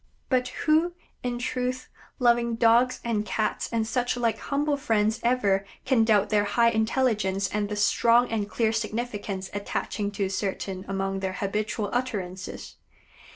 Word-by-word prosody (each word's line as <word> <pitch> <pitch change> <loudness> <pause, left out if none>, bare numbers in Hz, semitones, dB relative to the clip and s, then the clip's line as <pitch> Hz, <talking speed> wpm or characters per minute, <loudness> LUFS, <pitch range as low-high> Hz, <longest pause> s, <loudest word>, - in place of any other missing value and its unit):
But, 255 -1 +2 0.2
who, 320 +3 +3 0.3
in 245 -1 -2
truth, 250 +1 -2 0.3
loving 235 -1 +3
Dogs 235 +2 +3
and 225 -3 0
Cats 215 +1 -1
and 230 -1 0
such 245 +2 -1
like 230 -2 0
humble 290 +1 0
friends 220 -6 +1
ever 205 -6 +2 0.2
can 250 -4 +4
doubt 210 -2 +3
their 210 -1 +2
high 230 +3 +3
intelligence 220 -4 +1
and 205 0 -2
the 210 - -2
strong 235 +4 +4
and 210 -2 -1
clear 220 0 +1
significance 215 -4 -3
attaching 205 0 -2
to 200 -1 -1
certain 190 0 -3
among 195 0 -2
their 190 -1 -2
habitual 210 +2 -2
utterances? 195 -7 -4
220 Hz, 145 wpm, -26 LUFS, 205-245 Hz, 0.3 s, can